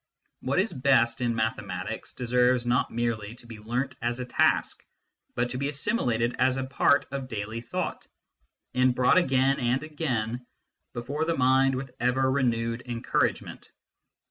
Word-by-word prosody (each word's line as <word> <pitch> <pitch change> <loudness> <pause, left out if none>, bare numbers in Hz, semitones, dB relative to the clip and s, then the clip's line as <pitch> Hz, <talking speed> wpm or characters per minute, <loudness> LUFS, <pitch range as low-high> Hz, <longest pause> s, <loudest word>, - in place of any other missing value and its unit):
What 130 +5 -1
is 190 +1 +1
best 130 -4 +2
in 120 -2 0
mathematics 105 -4 -3
deserves 125 0 +2
not 120 +1 +1
merely 115 -2 -2
to 120 - -13
be 115 -2 -10
learnt 125 +5 -2
as 120 0 -1
a 125 - -4
task, - - +1 0.5
but 120 +1 0
to 125 - -3
be 140 +1 -1
assimilated 125 - 0
as 130 0 +3
a 130 - -1
part 140 +2 +2
of 135 -2 -4
daily 110 -1 -5
thought, 115 - -4 0.7
and 130 0 +3
brought 125 +8 +5
again 135 -4 +2
and 125 +3 0
again 125 -7 -2 0.5
before 140 +6 -3
the 165 0 0
mind 130 +1 +4
with 130 0 -5
ever 130 +2 +2
renewed 115 -3 0
encouragement. 120 -1 -2
125 Hz, 150 wpm, -27 LUFS, 120-135 Hz, 0.7 s, brought